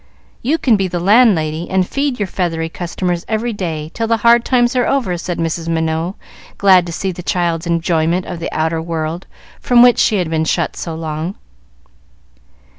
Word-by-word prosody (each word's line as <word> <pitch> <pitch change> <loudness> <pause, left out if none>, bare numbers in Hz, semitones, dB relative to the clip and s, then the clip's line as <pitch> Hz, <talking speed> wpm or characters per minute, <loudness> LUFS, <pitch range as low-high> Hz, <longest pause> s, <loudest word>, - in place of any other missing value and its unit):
You 290 +7 +1
can 240 -8 +3
be 195 -1 0
the 175 -1 -3
landlady, 175 -6 +3
and 185 -1 +1
feed 275 -2 -1
your 205 - 0
feathery 165 -4 -2
customers 175 +1 -3
every 225 +2 -1
day, 160 -6 -4
till 225 0 -2
the 230 0 +2
hard 235 0 +6
times 245 0 +2
are 250 - +2
over," 250 -10 0
said 175 0 -4
Mrs. 165 0 -2
Minot, 160 +2 -1 0.4
glad 185 -3 +5
to - - -5
see 190 +3 -2
the 180 - -8
child's 170 -1 -1
enjoyment 170 +1 0
of 175 - -6
the 165 - -4
outer 160 +1 -1
world 165 +1 -4 0.3
from 245 -1 +5
which 245 -1 +5
she 215 - +3
had 180 -5 -1
been 160 0 0
shut - - -1
so 165 -2 -5
long. 160 +3 -4
175 Hz, 185 wpm, -17 LUFS, 165-215 Hz, 0.4 s, hard